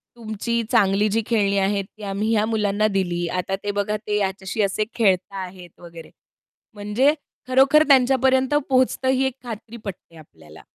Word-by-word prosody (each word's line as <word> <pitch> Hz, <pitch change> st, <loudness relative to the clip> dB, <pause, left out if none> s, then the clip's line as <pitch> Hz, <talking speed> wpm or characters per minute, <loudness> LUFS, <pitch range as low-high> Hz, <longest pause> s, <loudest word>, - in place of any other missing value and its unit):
तुमची 230 Hz, 0 st, -3 dB
चांगली 205 Hz, -2 st, +3 dB
जी 225 Hz, +2 st, 0 dB
खेळणी 200 Hz, -4 st, +1 dB
आहेत, 200 Hz, +1 st, 0 dB
ती 215 Hz, +1 st, -16 dB
आम्ही 200 Hz, +2 st, -2 dB
ह्या 215 Hz, -1 st, +2 dB
मुलांना 215 Hz, -1 st, 0 dB
दिली. 175 Hz, -4 st, -1 dB
आता 185 Hz, +2 st, -2 dB
ते 205 Hz, -, -1 dB
बघा, 205 Hz, +1 st, -1 dB
ते 210 Hz, 0 st, -3 dB
ह्याच्याशी 195 Hz, +1 st, -2 dB
असे 200 Hz, +2 st, 0 dB
खेळत 190 Hz, -5 st, +2 dB
आहेत 180 Hz, -2 st, -10 dB
वगैरे. 170 Hz, -2 st, -12 dB, 0.6 s
म्हणजे 210 Hz, +8 st, +1 dB, 0.3 s
खरोखर 270 Hz, +4 st, +5 dB
त्यांच्यापर्यंत 265 Hz, 0 st, +3 dB, 0.2 s
पोहोचतं. 260 Hz, 0 st, +1 dB
ही 265 Hz, 0 st, +2 dB
एक 265 Hz, -, -1 dB
खात्री 230 Hz, -1 st, -8 dB
पटते 180 Hz, -3 st, -9 dB
आपल्याला. 80 Hz, -, -16 dB
210 Hz, 155 wpm, -22 LUFS, 195-235 Hz, 0.6 s, खरोखर